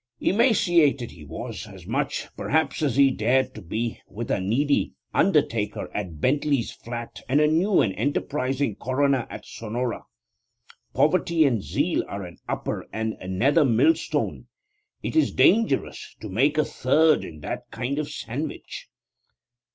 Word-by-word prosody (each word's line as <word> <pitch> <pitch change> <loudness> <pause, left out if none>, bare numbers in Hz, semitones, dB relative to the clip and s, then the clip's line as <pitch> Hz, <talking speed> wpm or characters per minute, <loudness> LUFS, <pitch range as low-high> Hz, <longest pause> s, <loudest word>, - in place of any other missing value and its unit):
Emaciated 175 - +3
he 80 - -13
was; 75 - -7
as - - -12
much, - - -2
perhaps, 160 -1 0
as 140 -6 +1
he 140 -1 +5
dared 125 -4 0
be, 115 +2 -2
with 115 +3 -5
a - - +1
needy 135 +10 +1 0.2
undertaker 145 - +1
at 90 -7 -4
Bentley's 140 - +1
Flat 120 0 -7
and 140 +3 +4
a 150 - +5
new 170 +7 +3
and 95 - +1
enterprising 135 -1 -1
coroner 135 0 +1
at - - -8
Sonora. 115 +2 -4 0.9
Poverty 165 0 +3
and 120 -7 +2
zeal - - 0
are 100 0 -5
an 90 -1 -10
upper - - -3
and 110 0 -2
a 90 - -8
nether 135 - +3
millstone. 135 - +1 0.6
It - - -3
is 315 - +3
dangerous 215 -9 +2
to 110 - -7
make 135 +11 +2
a 155 - +3
third 155 +4 +3
in 75 -1 -9
that - - -5
kind 130 +5 -3
of 150 - -3
sandwich. 145 +1 -6
135 Hz, 145 wpm, -25 LUFS, 115-150 Hz, 0.9 s, he